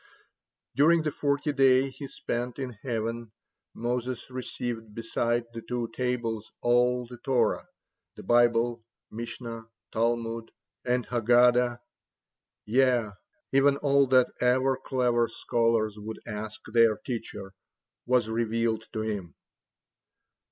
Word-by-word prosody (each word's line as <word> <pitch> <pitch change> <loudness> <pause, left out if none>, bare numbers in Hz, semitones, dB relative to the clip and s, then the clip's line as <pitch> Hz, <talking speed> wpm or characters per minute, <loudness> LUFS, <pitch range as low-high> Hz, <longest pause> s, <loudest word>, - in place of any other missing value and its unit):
During 160 +3 +5
the 155 - -1
forty 145 0 0
days 135 -1 +3
he 140 - -5
spent 125 -3 -4
in 130 -2 -4
heaven, 115 0 -4 0.4
Moses 125 +2 -3
received 120 -3 -5
beside 120 +1 0
the 115 - -6
two 120 0 -3
tables 115 -3 -2
all 125 +1 +3
the 120 +1 -11
Torah 130 -3 +1 0.5
the - - -10
Bible, 120 0 +3 0.3
Mishnah, 115 0 -6 0.3
Talmud, 115 0 -1 0.3
and 125 0 0
Haggadah, 120 0 +3 0.8
yea, 120 -2 +2 0.4
even 140 +1 +4
all 140 -1 +3
that 130 -1 +4
ever 130 +2 +3
clever 120 -2 +1
scholars 115 -2 0
would 110 +1 -7
ask 105 -1 -6
their 115 -2 +5
teacher 105 -5 -6 0.5
was 125 -3 +3
revealed 115 0 0
to 110 - -2
him. 100 -6 -4
120 Hz, 110 wpm, -28 LUFS, 115-125 Hz, 0.8 s, During